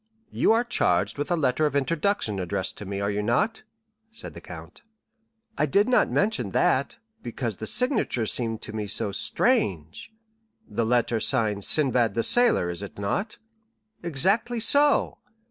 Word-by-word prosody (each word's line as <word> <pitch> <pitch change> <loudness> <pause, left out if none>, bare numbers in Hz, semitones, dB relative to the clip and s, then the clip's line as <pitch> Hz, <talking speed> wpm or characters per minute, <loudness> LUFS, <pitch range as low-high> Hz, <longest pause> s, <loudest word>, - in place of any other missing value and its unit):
"You - - +2
are 230 +1 +2
charged 100 - 0
with 145 - -3
a 175 - +2
letter 150 0 +1
of 145 - -5
introduction 145 - 0
addressed 95 +1 -3
to 105 - -7
me, 100 +1 -4
are 100 +1 -1
you 105 0 -2
not?" 160 - 0 0.5
said 230 +1 -8
the - - -11
count. - - -11 0.8
"I 150 - +2
did 200 - +2
not 255 - +3
mention 160 - 0
that, 135 +2 +1 0.2
because 120 - -4
the 110 - -4
signature 250 - +1
seemed 115 0 -2
to 110 - -9
me 105 -1 -4
so 100 0 -1
strange." 100 - 0 0.6
"The 115 - -2
letter 120 -1 +1
signed 110 -5 0
'Sinbad 125 -8 +2
the 115 - 0
Sailor,' 240 - +2
is 85 - -7
it 100 - -9
not?" 185 - -3 0.6
"Exactly 190 - 0
so. 285 +6 +3
125 Hz, 160 wpm, -25 LUFS, -, 0.8 s, not